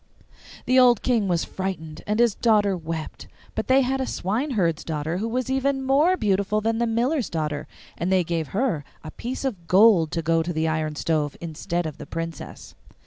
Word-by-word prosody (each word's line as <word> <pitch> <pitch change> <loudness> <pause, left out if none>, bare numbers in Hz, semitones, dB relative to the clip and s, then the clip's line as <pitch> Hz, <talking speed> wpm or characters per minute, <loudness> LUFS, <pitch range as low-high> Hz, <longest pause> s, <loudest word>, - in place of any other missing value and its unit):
The 255 +1 +4
old 245 -3 +5
King 230 -5 +2
was 175 -2 0
frightened, 160 -5 -5
and 210 +2 0
his 235 -3 +4
daughter 210 -4 +2
wept. 165 -2 -6 0.3
But - - -3
they 265 +1 +5
had 265 +1 0
a 260 - -2
swineherd's 200 - -1
daughter 160 +2 -3
who 220 - -2
was 250 +2 -2
even 270 +1 0
more 300 +8 +3
beautiful 200 - +1
than 225 +1 0
the 235 - +1
miller's 240 +4 0
daughter, 150 -3 -3 0.3
and 175 +2 -1
they 185 -1 +4
gave 165 -2 -2
her 200 - -1 0.2
a 155 - -7
piece 255 - -5
of 190 -11 -4
gold 190 -4 +5
to 165 -1 -1
go 165 +1 +2
to 175 +2 -3
the 160 0 0
iron 155 -1 -1
stove 150 -2 -1
instead 170 +1 -3
of 155 -3 -6
the - - -8
Princess. 165 0 -7
190 Hz, 195 wpm, -24 LUFS, 165-240 Hz, 0.3 s, old